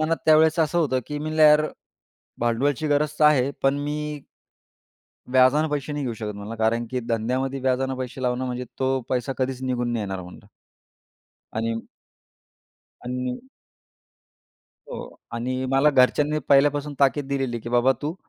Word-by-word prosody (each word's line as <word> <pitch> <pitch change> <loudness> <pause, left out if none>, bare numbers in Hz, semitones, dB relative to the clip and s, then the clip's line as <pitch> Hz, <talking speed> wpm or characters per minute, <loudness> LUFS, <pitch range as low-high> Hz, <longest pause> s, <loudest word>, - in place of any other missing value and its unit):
मनात 160 +1 +1
त्यावेळेस 155 +1 +5
असं 160 +2 +1
होतं, 130 -6 +1
की 150 0 -4
मी 150 - -5
म्हणलं, 155 0 +1
यार 150 0 +6 0.7
भांडवलची 135 +6 0
गरज 150 +1 +1
तर - - +6
आहे. 140 -3 +4
पण 135 +1 +2
मी 150 0 -4 1.1
व्याजाने 130 +5 +5
पैसे 150 0 -3
नाही 145 -1 -3
घेऊ 120 - -2
शकत." 105 -1 -4
म्हणला, 100 +2 -7
"कारण 115 +1 +1
की 130 -1 -2
धंद्यामध्ये 130 +4 -1
व्याजाने 130 0 0
पैसे 130 +1 -5
लावणं 125 0 0
म्हणजे 125 0 -4
तो 130 0 +1
पैसा 130 +1 -1
कधीच 130 0 -2
निघून 120 -2 -1
नाही 115 -3 -1
येणार" 95 -1 -4
म्हणल. 90 0 -13 1.1
आणि 115 +1 -1 1.3
आणि 125 0 -4 1.5
हो. - - -6 0.3
आणि 130 +2 -2
मला 135 +3 +4
घरच्यांनी 145 +3 +3
पहिल्यापासून 145 +1 +3
ताकीद 140 0 +2
दिलेली, 135 -4 -1
की 120 - -7
"बाबा 120 +2 +3
तू" 155 +3 -2
135 Hz, 150 wpm, -24 LUFS, 125-150 Hz, 1.5 s, यार